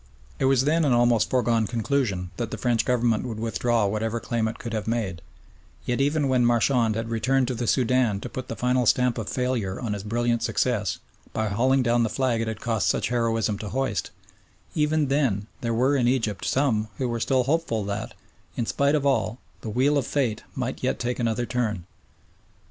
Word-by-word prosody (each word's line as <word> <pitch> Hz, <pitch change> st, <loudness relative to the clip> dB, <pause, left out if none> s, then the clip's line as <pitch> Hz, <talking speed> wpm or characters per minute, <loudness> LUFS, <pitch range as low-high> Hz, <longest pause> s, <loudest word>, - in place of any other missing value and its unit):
It 135 Hz, -, +1 dB
was 130 Hz, -1 st, +4 dB
then 160 Hz, +3 st, +3 dB
an 140 Hz, -4 st, +3 dB
almost 120 Hz, -2 st, +3 dB
foregone 115 Hz, -3 st, +2 dB
conclusion 115 Hz, -7 st, -1 dB
that 115 Hz, -, -2 dB
the -, -, -5 dB
French 120 Hz, -2 st, +1 dB
Government 120 Hz, -3 st, +1 dB
would 115 Hz, -4 st, -5 dB
withdraw 115 Hz, 0 st, +1 dB
whatever 110 Hz, +3 st, -1 dB
claim 115 Hz, 0 st, -1 dB
it 110 Hz, -, -5 dB
could 115 Hz, -2 st, -6 dB
have 110 Hz, -2 st, -3 dB
made, 105 Hz, -7 st, -2 dB, 0.6 s
yet 120 Hz, +2 st, 0 dB
even 145 Hz, +1 st, +2 dB
when 130 Hz, -2 st, +3 dB
Marchand 120 Hz, -1 st, +2 dB
had 115 Hz, 0 st, -3 dB
returned 130 Hz, +3 st, +1 dB
to -, -, -1 dB
the 120 Hz, 0 st, -3 dB
Soudan 125 Hz, -5 st, +2 dB
to -, -, -5 dB
put 130 Hz, -1 st, -6 dB
the 115 Hz, -, -5 dB
final 125 Hz, 0 st, +1 dB
stamp 125 Hz, 0 st, +3 dB
of 110 Hz, -, -4 dB
failure 125 Hz, -7 st, -1 dB
on 115 Hz, -4 st, -2 dB
his 100 Hz, -, -4 dB
brilliant 120 Hz, +2 st, 0 dB
success 105 Hz, -8 st, 0 dB, 0.4 s
by 110 Hz, -1 st, -1 dB
hauling 130 Hz, +6 st, +2 dB
down 120 Hz, 0 st, +2 dB
the 115 Hz, -, +1 dB
flag 125 Hz, -1 st, 0 dB
it 115 Hz, -, -2 dB
had 110 Hz, -2 st, -4 dB
cost 115 Hz, -4 st, 0 dB
such -, -, +1 dB
heroism 115 Hz, -3 st, 0 dB
to 105 Hz, -, -5 dB
hoist, 125 Hz, -9 st, -1 dB, 0.6 s
even 155 Hz, -1 st, +2 dB
then 130 Hz, -8 st, +1 dB, 0.2 s
there 115 Hz, -, -1 dB
were 130 Hz, +5 st, +2 dB
in 125 Hz, -3 st, +2 dB
Egypt 115 Hz, -6 st, 0 dB
some 120 Hz, -6 st, +1 dB
who 130 Hz, -, -1 dB
were 120 Hz, -1 st, -2 dB
still 130 Hz, +2 st, +2 dB
hopeful 135 Hz, -6 st, 0 dB
that, 100 Hz, +1 st, -4 dB, 0.4 s
in 120 Hz, -, 0 dB
spite 140 Hz, +6 st, +2 dB
of 145 Hz, -2 st, 0 dB
all, 130 Hz, -4 st, +1 dB, 0.2 s
the 110 Hz, -, -5 dB
wheel 135 Hz, +6 st, +2 dB
of 130 Hz, -, -3 dB
fate 125 Hz, -7 st, 0 dB
might -, -, -3 dB
yet -, -, 0 dB
take 125 Hz, +1 st, -2 dB
another 115 Hz, 0 st, 0 dB
turn. 115 Hz, -8 st, -2 dB
120 Hz, 200 wpm, -25 LUFS, 110-130 Hz, 0.6 s, was